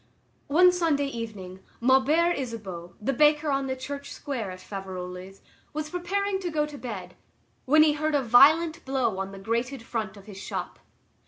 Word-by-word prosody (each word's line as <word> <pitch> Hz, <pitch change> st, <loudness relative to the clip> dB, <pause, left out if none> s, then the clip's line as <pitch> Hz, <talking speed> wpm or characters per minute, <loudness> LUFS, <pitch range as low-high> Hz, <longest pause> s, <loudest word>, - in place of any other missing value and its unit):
One 360 Hz, +5 st, +6 dB
Sunday 325 Hz, -5 st, +1 dB
evening, 215 Hz, -8 st, -6 dB, 0.2 s
Maubert 275 Hz, +8 st, +4 dB
Isabeau, 195 Hz, -9 st, -6 dB
the 250 Hz, +6 st, -1 dB
baker 300 Hz, +2 st, +3 dB
on 275 Hz, 0 st, 0 dB
the 260 Hz, -, -2 dB
Church 280 Hz, +2 st, -7 dB
Square 245 Hz, -8 st, -4 dB
at 185 Hz, 0 st, -8 dB
Faverolles, 185 Hz, -1 st, -7 dB, 0.3 s
was 305 Hz, 0 st, -4 dB
preparing 385 Hz, +3 st, -1 dB
to 365 Hz, -2 st, -3 dB
go 305 Hz, -2 st, 0 dB
to 300 Hz, -1 st, -9 dB
bed, 190 Hz, -7 st, -6 dB, 0.5 s
when 310 Hz, +4 st, +6 dB
he 305 Hz, -1 st, +4 dB
heard 305 Hz, 0 st, -1 dB
a 280 Hz, -, +2 dB
violent 315 Hz, +8 st, +5 dB
blow 260 Hz, -7 st, 0 dB
on 195 Hz, 0 st, -3 dB
the 195 Hz, -, -9 dB
grated 230 Hz, +5 st, -2 dB
front 220 Hz, -4 st, -4 dB
of 195 Hz, -, -14 dB
his 200 Hz, -3 st, -10 dB
shop. -, -, -5 dB
265 Hz, 170 wpm, -27 LUFS, 200-305 Hz, 0.5 s, One